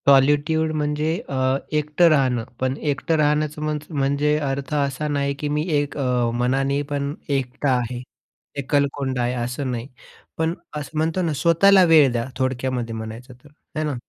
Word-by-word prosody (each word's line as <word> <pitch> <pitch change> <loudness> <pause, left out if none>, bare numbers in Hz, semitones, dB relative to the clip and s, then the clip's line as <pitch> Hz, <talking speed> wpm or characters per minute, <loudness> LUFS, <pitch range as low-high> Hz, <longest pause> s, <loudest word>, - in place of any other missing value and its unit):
Solitude 145 +3 +4
म्हणजे 150 +1 0 0.2
अ, 135 - -3 0.4
एकटं 150 +3 +3
राहणं, 130 -6 +2 0.2
पण 130 0 0 0.2
एकटं 150 +4 -1
राहण्याचं 150 0 +1
मन्स 150 -1 -3
म्हणजे 145 0 +1
अर्थ 135 0 -3
असा 140 +1 -1
नाही 140 -1 0
की 150 - -2
मी 150 +1 0 0.2
एक 145 0 -4
अ, 125 -3 +1
मनाने 135 +3 +1
पण 140 0 -1 0.2
एकटा 135 +2 -1
आहे, 125 0 -3 0.6
एकलकोंडा 140 -2 0
आहे 120 +1 0
असं 125 +2 -3
नाही. 120 0 -4 0.5
पण 160 +1 0 0.2
असं 150 +1 -6
म्हणतो 160 +4 0
ना, 165 -3 0
स्वतःला 185 +6 +5
वेळ 145 -5 +7
द्या, 120 -1 -1
थोडक्यामध्ये 130 -2 -1
म्हणायचं 110 +3 -7
तर 145 - -16 0.3
आहे 155 - -1
ना? 145 -3 -2
140 Hz, 160 wpm, -22 LUFS, 130-150 Hz, 0.6 s, वेळ